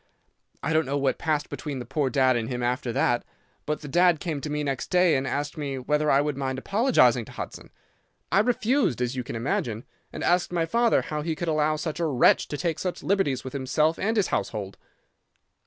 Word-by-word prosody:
I 160 - 0
don't 155 -3 +2
know 140 +1 0
what 135 -1 0
passed 155 -2 0
between 145 -3 -5
the 125 - -6
poor 135 +2 -1
dad 130 0 +3
and 115 -1 -2
him 125 -1 -3
after 125 0 -1
that, 120 +1 +1 0.4
but 150 0 -2
the 150 - -8
dad 175 +2 +3
came 155 -4 -3
to 150 - -5
me 150 0 -2
next 135 -3 -2
day 180 -2 +4
and 135 0 -1
asked 145 +2 -3
me 140 -2 -3
whether 150 +4 0
I 135 0 +5
would 150 -1 -1
mind 130 -1 -2
apologising 220 - +3
to - - -13
Hudson. - - -7 0.6
I - - +4
refused, 245 - +1
as 125 +1 -1
you 125 - -2
can - - -6
imagine, 115 -1 -2 0.3
and - - -6
asked 175 0 +2
my 170 -2 +1
father 235 +7 +2
how 150 -1 -3
he 160 +1 -2
could 175 - -4
allow 155 0 +2
such 155 +1 -4
a 170 - +1
wretch 130 -5 +4
to 145 - -4
take 165 -2 -2
such 180 -1 -4
liberties 180 -10 +1
with 130 - -7
himself 150 +4 +1
and 220 +3 0
his 205 - +2
household. 100 -3 -3
150 Hz, 220 wpm, -26 LUFS, 130-165 Hz, 0.6 s, I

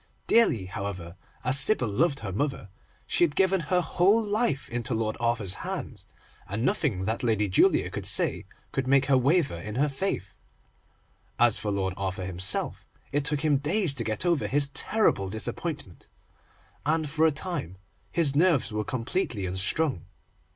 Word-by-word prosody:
Dearly, 130 - +3
however, 90 -2 -6 0.3
as 130 +3 +3
Sybil 135 - +4
loved 140 +8 0
her 100 -4 -5
mother, 120 -1 -3 0.4
she - - +1
had 155 -4 +1
given 190 0 +3
her 180 +3 0
whole 185 +5 +3
life 210 - 0
into 120 +1 -3
Lord 110 -1 -1
Arthur's 115 -6 0
hands, - - -5 0.4
and 105 +5 -3
nothing 110 - 0
that 110 +3 -2
Lady 110 -4 +1
Julia 95 - +3
could - - -5
say - - 0 0.3
could 130 -1 -2
make 135 0 +4
her 140 - +3
waver 140 - +2
in 105 +5 -7
her 140 +4 +2
faith. 135 - -3 1.0
As 120 -1 +3
for 105 - -3
Lord 95 -2 -1
Arthur 95 -1 -3
himself, 95 +2 0 0.3
it 145 0 0
took 150 0 0
him 150 -2 +2
days 155 +3 +1
to 125 -4 0
get 110 +9 -3
over 170 -4 +1
his 140 0 +2
terrible 140 - +2
disappointment, 110 - -5 0.7
and 155 +1 0
for 160 +2 +2
a - - +2
time 145 - -2 0.3
his 150 -5 +2
nerves 160 -6 +3
were 105 0 -1
completely 115 - -2
unstrung. 95 - +1
130 Hz, 160 wpm, -27 LUFS, 105-160 Hz, 1.0 s, Sybil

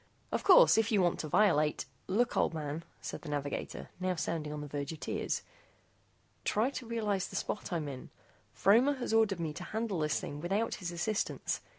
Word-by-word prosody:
Of - - 0
course, - - +8
if 225 +1 +1
you 210 - +4
want 175 -2 +2
to 155 - -3
violate 155 -4 +3
" - - -37
"Look, 245 +1 +2
old - - +2
man," 155 +1 -4 0.2
said - - -5
the 160 - -8
navigator, 145 -1 -4
now 185 0 0
sounding 155 -2 -2
on 150 0 -4
the 150 - -6
verge 145 0 -4
of 160 - -8
tears, - - -2 1.0
"try 225 +6 +1
to 255 -4 -6
realize 210 -5 -1
the - - -9
spot 210 - -3
I'm 165 -4 -1
in. 135 -2 -7 0.4
Fromer 245 +8 +4
has 245 -4 -3
ordered 220 -5 +3
me 160 -2 -2
to - - -7
handle 220 -5 -2
this 155 0 +1
thing 145 +1 -6
without 200 +7 0
his 175 -1 -3
assistance. 200 +5 -1
180 Hz, 200 wpm, -32 LUFS, 150-220 Hz, 1.0 s, course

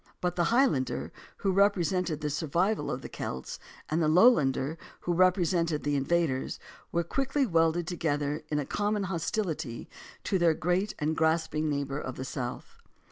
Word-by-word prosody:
But 180 -1 -1
the 175 - +2
High 245 +8 +4
lander, 130 - -1 0.3
who 195 - 0
represented 185 -4 +2
the 150 -1 -1
survival 170 +8 0
of 130 - -4
the - - -5
Celts, 65 0 -6 0.3
and 160 +2 0
the 155 - +3
Lowlander, 155 - +4 0.2
who 175 - -1
represented 175 -3 +2
the 145 0 0
invaders, 140 -1 0 0.3
were 170 0 +1
quickly 275 - 0
welded 165 -3 +2
together 150 -3 -1
in 150 - 0
a 145 - -1
common 205 +3 -1
hostility 170 - -3 0.4
to 190 - 0
their 170 -2 +4
great 180 +5 0
and 155 +1 -1
grasping 160 -1 +1
neighbor 140 -1 -2
of 130 -3 -5
the 130 - -5
South. 125 -2 -6
165 Hz, 160 wpm, -29 LUFS, 150-185 Hz, 0.4 s, High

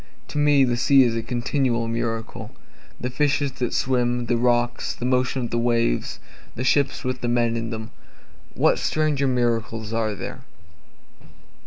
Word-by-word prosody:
To 150 - -3
me 145 -2 +5
the 120 -2 +1
sea 135 +2 +5
is 120 -2 +1
a 115 - -1
continual 120 0 -1
miracle, 115 -1 -3 0.5
The 125 - -3
fishes 145 0 +1
that 125 -2 -1
swim 120 -1 0
the 120 +1 +1
rocks 120 0 0
the 120 - -5
motion 130 0 +1
of - - -6
the 120 - 0
waves 115 - 0 0.4
the 120 - -3
ships 140 +2 +1
with 130 0 -3
the 120 - -1
men 120 -1 +1
in 115 0 -3
them, 110 -1 -6 0.6
What - - +3
stranger 150 -3 0
miracles 115 -3 -1
are 110 -2 -1
there? - - -7
120 Hz, 160 wpm, -23 LUFS, 115-130 Hz, 0.6 s, me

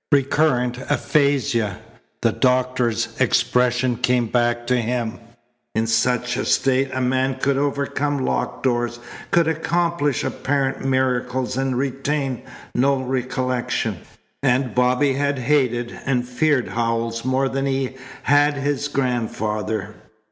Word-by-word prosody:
"Recurrent 135 -3 +2
aphasia." 130 -7 +1 0.5
The - - +4
doctor's 125 -2 +1
expression 125 0 +2
came 125 0 +2
back 120 +1 0
to 125 +1 +2
him. 120 -1 -2 0.6
In 110 +1 +1
such 125 +2 +1
a - - -1
state 135 0 +2
a 130 - -2
man 130 +1 +1
could 135 +1 0
overcome 140 0 -1
locked - - -2
doors, 120 -2 0 0.3
could 170 -4 +3
accomplish 165 -2 0
apparent 135 -1 -1
miracles 130 -1 0
and 135 -1 0
retain 135 0 -1 0.3
no 135 +2 +2
recollection. 130 -1 -2 0.4
And 130 -3 +1
Bobby 125 +3 +3
had 140 +1 0
hated 120 -3 +1
and 125 -3 +1
feared 130 +1 +1
Howells 115 0 -1
more 130 +1 +1
than 135 +1 -1
he 135 -1 -1 0.3
had 145 +1 +4
his 145 +1 -1
grandfather. 110 -5 -2
130 Hz, 120 wpm, -22 LUFS, 120-140 Hz, 0.6 s, The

